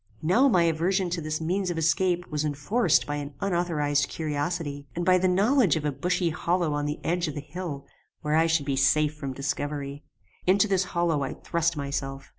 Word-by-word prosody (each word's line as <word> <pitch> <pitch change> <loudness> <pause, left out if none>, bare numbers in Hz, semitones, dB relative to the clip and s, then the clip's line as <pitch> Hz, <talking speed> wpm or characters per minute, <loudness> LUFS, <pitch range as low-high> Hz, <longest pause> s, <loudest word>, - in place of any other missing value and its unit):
Now 225 - +4
my 185 -9 +4
aversion 175 +3 +1
to 170 -1 -2
this 155 0 -3
means 180 +4 -1
of 175 - -3
escape 175 +2 +1
was 150 0 -1
enforced 155 - +1
by 145 0 -3
an 145 -1 -6
unauthorized 160 -6 0
curiosity, 145 -1 -3
and 175 0 -2
by 185 0 +5
the 185 - +2
knowledge 200 - +3
of 155 -2 -3
a 150 - +1
bushy 175 +5 0
hollow 170 -1 0
on 145 0 -1
the 150 - -3
edge 175 +1 0
of 150 - -5
the - - -3
hill, 145 -1 -6 0.4
where 150 0 -1
I 165 +1 +4
should 165 -3 +1
be 140 -1 0
safe 145 +3 +3
from 140 -3 -5
discovery. 140 +1 -4 0.4
Into 195 +3 +4
this 190 -2 +1
hollow 165 -4 +2
I 135 - -3
thrust 170 -1 -1
myself. 140 -1 -4
160 Hz, 200 wpm, -26 LUFS, 145-180 Hz, 0.4 s, by